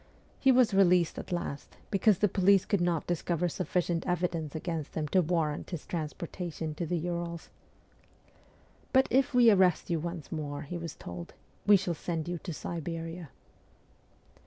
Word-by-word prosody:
He 265 - +5
was 250 -4 +4
released 180 -3 +4
at - - -8
last, 170 -5 -4
because 200 0 +4
the 210 - +3
police 195 0 +4
could 200 -4 +1
not 175 -3 +1
discover 175 0 0
sufficient 175 -1 -1
evidence 170 -4 -1
against 160 -2 -4
him 155 -1 -1
to 185 - +4
warrant 160 -3 -1
his 170 -5 -6
transportation 165 0 -4
to 165 +2 -4
the 175 - 0
Urals! 170 0 -4 0.7
' - - -32
But 265 0 +5
if 265 -1 +2
we 240 -2 +7
arrest 185 -3 +3
you 165 - +1
once 170 -1 -6
more,' 145 -3 -4
he 175 +4 -5
was 165 -2 -6
told, 85 0 -8
' - - -31
we 205 -1 +8
shall 185 -2 -2
send 165 0 -4
you 175 -1 -3
to 175 - -6
Siberia.' 165 0 -5
175 Hz, 165 wpm, -30 LUFS, 160-185 Hz, 0.7 s, we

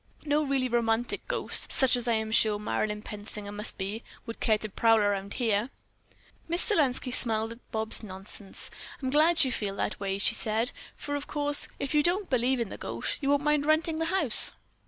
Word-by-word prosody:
No 295 0 +1
really 270 -2 0
romantic 235 -1 -1
ghost, - - +1
such 265 -1 +3
as 245 -1 -3
I 235 - +2
am 220 0 -2
sure 215 -1 +3
Marilyn 210 - -3
Pensinger 210 -1 -8
must 210 +2 -4
be, 205 +4 -5 0.2
would 230 -1 -8
care 215 -1 +2
to 215 - -5
prowl 225 +2 +3
around 205 -1 -1
here." 225 -1 0 0.8
Miss 340 +2 +3
Selenski 270 - +1
smiled 225 -3 +2
at 230 +1 -15
Bobs' 220 0 +2
nonsense. 195 -1 -5 0.3
"I'm 260 -2 -3
glad 315 +4 +5
you 260 - 0
feel 205 -4 -3
that - - -3
way," 195 -1 -3
she 200 - +4
said, 220 +2 0 0.2
"for, 290 - -6
of 285 0 -4
course, 290 -1 +2
if 275 - -3
you 300 - +4
don't 360 +4 +1
believe 255 +1 +1
in 230 -4 -2
the - - -9
ghost, 115 +1 -4
you 275 - -1
won't 285 0 +2
mind 300 -1 +1
renting 315 +1 +1
the 325 - 0
house." 375 +3 +5
235 Hz, 200 wpm, -28 LUFS, 210-285 Hz, 0.8 s, glad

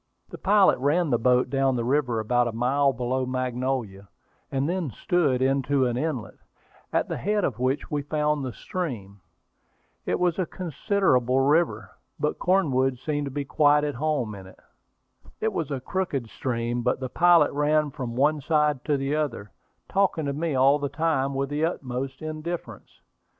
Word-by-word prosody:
The - - -9
pilot 200 -5 +4
ran 150 +4 +1
the 120 - +2
boat 125 +1 +2
down 135 -1 +2
the 120 - -1
river 125 -3 +1
about 120 +2 +1
a - - -2
mile 135 +5 +2
below 130 +1 -2
Magnolia, 125 -5 -3 0.4
and 135 +1 0
then 175 -3 -1
stood 135 - +1
into 135 0 +2
an 120 -1 0
inlet, 130 -4 -3 0.5
at - - +1
the - - -3
head 210 +1 0
of 120 -8 -1
which 130 +3 -1
we 145 -1 0
found 150 0 0
the 130 - -3
stream. 110 - -5 0.9
It - - 0
was 175 0 +1
a 180 - 0
considerable 155 - +1
river, 135 - +1 0.3
but 150 - -1
Cornwood 135 -9 +2
seemed 145 +3 -2
to - - -4
be 145 +1 -3
quite 150 +1 +3
at 145 -1 -1
home 135 -5 -1
in 95 -2 -10
it. 95 - -16 0.8
It 220 -1 -1
was 160 -6 -2
a 140 -2 -2
crooked 140 -6 -3
stream, 120 -1 -2
but 125 +1 0
the 130 - -3
pilot 170 +2 +4
ran 150 +1 +1
from 125 -4 -5
one 145 +3 +2
side 150 -2 +1
to 145 -2 +1
the 135 +2 -1
other, 120 - -3 0.4
talking 190 -5 +1
to 140 - -1
me 155 0 -2
all 135 +3 +4
the 140 -1 -2
time 140 -2 0
with 135 0 -1
the 145 +2 -1
utmost 135 -4 -3
indifference. 155 +2 -6
140 Hz, 175 wpm, -25 LUFS, 125-155 Hz, 0.9 s, pilot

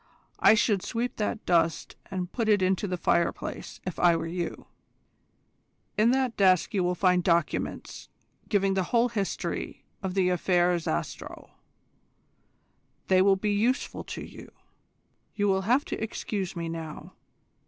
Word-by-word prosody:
I - - +7
should 210 -3 +2
sweep 240 +4 -3
that 215 +1 -2
dust 165 -2 +1
up - - -30
and 185 -2 -3
put 230 -3 -1
it 205 -3 +4
into 190 +2 +1
the 180 -1 -2
fireplace, 170 0 -1
if 185 - -5
I 175 -1 +5
were 165 0 -2
you. 170 +1 -4 1.3
In 215 +2 +4
that 255 -2 +1
desk 185 -3 +3
you 190 -3 +1
will 180 0 0
find 180 -1 +3
documents 170 -3 -1 0.4
giving 195 -2 +2
the 190 -1 0
whole 240 0 +3
history 205 -4 -4 0.2
of 190 -1 -4
the 185 -2 +3
Affaire 180 0 +2
Zastrow. 75 - -5 1.6
They 185 -1 +5
will 195 0 +5
be 205 +2 -1
useful 235 +6 0
to - - -6
you. - - -12 0.9
You 205 -1 +1
will 190 -1 +2
have 260 +4 +3
to - - -4
excuse 200 -4 -4
me 170 -1 -3
now. 165 -2 -7
190 Hz, 150 wpm, -27 LUFS, 175-210 Hz, 1.6 s, I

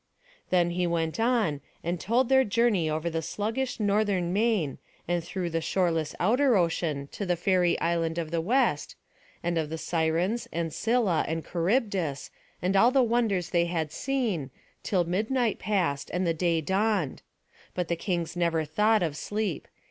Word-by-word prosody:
Then 175 -1 +3
he 180 0 0
went 165 +1 -1
on, 225 - +1 0.2
and 175 +1 -2
told 240 +5 +2
their 265 +1 +5
journey 210 -7 +2
over 155 +2 -2
the 165 -1 -1
sluggish 225 +10 -3
northern 200 -4 +1
main, 205 - +1 0.3
and 175 0 0
through 175 0 -4
the 165 0 -1
shoreless 165 -2 0
outer 245 +4 +3
ocean, 165 -5 0
to - - -5
the 180 -2 +1
fairy 180 0 +2
island 165 -1 0
of 165 -2 -3
the 165 -1 0
West; 230 - +1 0.5
and 170 -1 0
of 155 -2 -2
the 160 - -4
Sirens, 170 +8 0
and 165 -1 -2
Scylla, 225 -8 +1
and 160 +1 -3
Charybdis, 180 - -1 0.3
and 185 +2 +1
all 230 +5 +6
the 260 0 +4
wonders 225 -7 0
they 170 -1 +3
had 165 -3 -2
seen, 225 - -1 0.3
till 185 -3 +1
midnight 215 +6 0
passed, 175 -9 -1
and 180 +1 0
the 165 - +2
day 165 0 +1
dawned; 190 -2 0 0.5
but 180 -2 -1
the 170 - 0
kings 170 -1 -2
never 170 -2 +1
thought 210 +6 +2
of 155 -4 -2
sleep. 205 +1 -3
175 Hz, 165 wpm, -27 LUFS, 165-215 Hz, 0.5 s, all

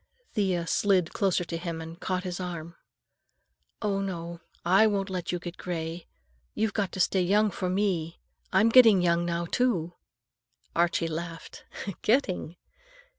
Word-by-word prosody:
Thea 185 -5 0
slid 185 0 +2
closer 190 -3 +1
to 165 0 -4
him 165 -1 -4
and 165 +1 -8
caught 185 -1 -2
his 180 -1 -4
arm. 170 -2 -6 1.1
"No, 200 -2 0
no. 170 -3 -5 0.2
I 195 +5 +6
won't 195 -2 -1
let 180 -2 -3
you 180 - -1
get 175 +1 -8
gray. 165 -1 -5 0.5
You've 220 -2 0
got 200 -3 -1
to - - -5
stay 185 +1 +3
young 205 +4 +3
for 185 -1 -3
me. 180 -4 -1 0.3
I'm 200 +4 +4
getting 225 -6 +7
young 170 0 +2
now, 170 0 -1
too." 175 -5 0 0.8
Archie 170 0 +2
laughed. 165 +1 -7 0.4
"Getting?" 210 - +1
180 Hz, 145 wpm, -28 LUFS, 170-195 Hz, 1.1 s, getting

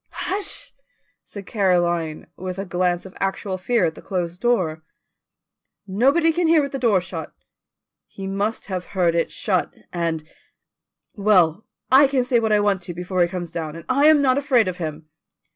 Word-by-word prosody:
"Hush!" 400 +1 -3 0.5
said 200 -2 -10
Caroline, 175 -6 0
with 185 0 -6
a 195 - -4
glance 180 -1 0
of 190 - -12
actual 195 0 -2
fear 225 0 +1
at 160 - -1
the - - -12
closed 180 -1 -4
door. 185 -10 +1 1.0
"Nobody 275 - +3
can 345 0 +1
hear 325 0 +5
with 280 - -4
the 270 - -4
door 225 -6 +3
shut." 180 - -7 0.8
"He 195 - -9
must 200 +3 -2
have 185 -3 -4
heard 175 -2 +3
it 170 0 +1
shut, 185 -4 -1 0.2
and 165 -3 -2 0.5
" - - -43
"Well, 180 -2 +4 0.2
I 270 +2 +7
can 265 -2 +1
say 245 -1 +2
what 220 -1 0
I 210 - +4
want 205 -2 +1
to 175 -1 -7
before 180 +1 -2
he 175 - +4
comes 175 -2 -5
down, 160 -2 -5
and 165 -1 -10
I 280 +3 +4
am 305 -2 +6
not 260 0 +3
afraid 260 -7 +3
of 180 -1 -3
him." 155 -2 -5
190 Hz, 180 wpm, -22 LUFS, 175-240 Hz, 1.0 s, I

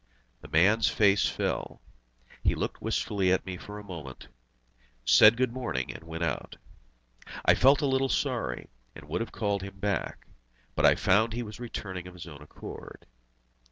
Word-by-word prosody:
The - - -11
man's 105 +7 +4
face 100 -1 +3
fell. - - -3 0.6
He - - +2
looked - - -4
wistfully 95 -3 0
at 95 - +1
me 95 -1 -5
for 105 +3 -9
a 105 - -9
moment, 80 -10 -9 0.8
said 110 - +7
"Good 130 -2 +1
morning," 120 - -3
and 80 - -11
went 80 +1 -5
out. 80 - -3 0.9
I - - +7
felt 140 +3 +4
a - - +3
little 135 0 +1
sorry, 60 - -2 0.2
and 75 -2 -12
would 75 - -2
have 115 - -4
called 100 -3 -1
him 95 0 -8
back, 100 -1 -2 0.5
but - - +4
I - - +5
found 110 +4 +2
he 120 +1 -3
was 105 0 -9
returning 95 -6 -6
of 90 - -12
his 90 - -9
own 75 -4 -11
accord. 75 - -10
100 Hz, 170 wpm, -28 LUFS, 85-115 Hz, 0.9 s, said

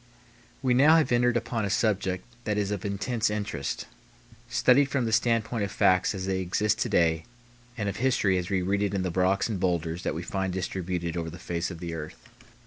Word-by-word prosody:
We 130 -2 +3
now 145 +6 +6
have 160 -6 +3
entered 120 0 +3
upon 115 -1 -2
a 100 - -1
subject 95 -2 0 0.2
that 105 -1 0
is 105 -1 0
of 100 -3 -3
intense 110 +3 -1
interest, 105 -9 -3 0.6
studied 135 +3 +4
from 130 -4 0
the 110 - -1
standpoint 115 0 +1
of 100 - -3
facts 95 +2 +3
as 95 -1 -4
they 95 -1 -1
exist 105 +4 0
to - - 0
day 80 -2 +2 0.5
and 105 -3 -2
of 100 - -3
history 110 -7 +2
as 90 +1 -5
we 95 -2 0
read 100 +2 0
it 100 -1 0
in 95 - 0
the 90 - -1
rocks 95 +2 +2
and 105 -5 -3
bowlders 85 -2 -1
that - - -2
we 85 - -4
find 95 0 -2
distributed 90 -2 -3
over 85 -1 -3
the 85 - -9
face 85 0 -3
of 90 - -7
the 85 0 -5
earth. 80 -1 -6
100 Hz, 215 wpm, -27 LUFS, 90-110 Hz, 0.6 s, now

